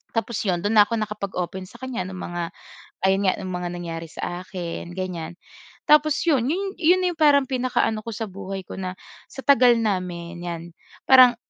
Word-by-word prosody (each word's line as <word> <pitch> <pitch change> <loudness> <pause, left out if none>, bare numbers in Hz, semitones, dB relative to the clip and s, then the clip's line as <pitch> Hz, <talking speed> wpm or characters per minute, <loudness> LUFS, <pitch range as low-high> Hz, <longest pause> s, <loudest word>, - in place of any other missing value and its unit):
Tapos 225 -1 -1
'yon, 180 -3 +1
do'n 215 +2 +1
na 205 - +10
ako 230 - -1
nakapag-open 190 -3 -4
sa 235 +4 -15
kaniya 260 -7 -3
ng 190 - -7
mga 175 -1 -4 0.6
ayun 195 +1 +3
nga, - - +2
ng 185 - -5
mga 180 0 -3
nangyari 165 -1 -5
sa 175 +1 -4
akin 175 -2 -6
ganyan. 175 -3 -4 0.5
Tapos 300 0 +5
'yon, 265 -7 +3 0.3
'yon 360 +3 +4
na 355 - +1
'yong 325 - -22
parang 285 -2 +6
pinaka-ano 245 -4 0
ko - - -4
sa 225 - -3
buhay 195 0 -6
ko - - -9
na 185 0 -4 0.3
sa 270 - -8
tagal 250 -4 +6
namin 180 -5 -2
'yan 170 -1 -4 0.4
parang 255 -2 +8
200 Hz, 185 wpm, -24 LUFS, 180-250 Hz, 0.6 s, na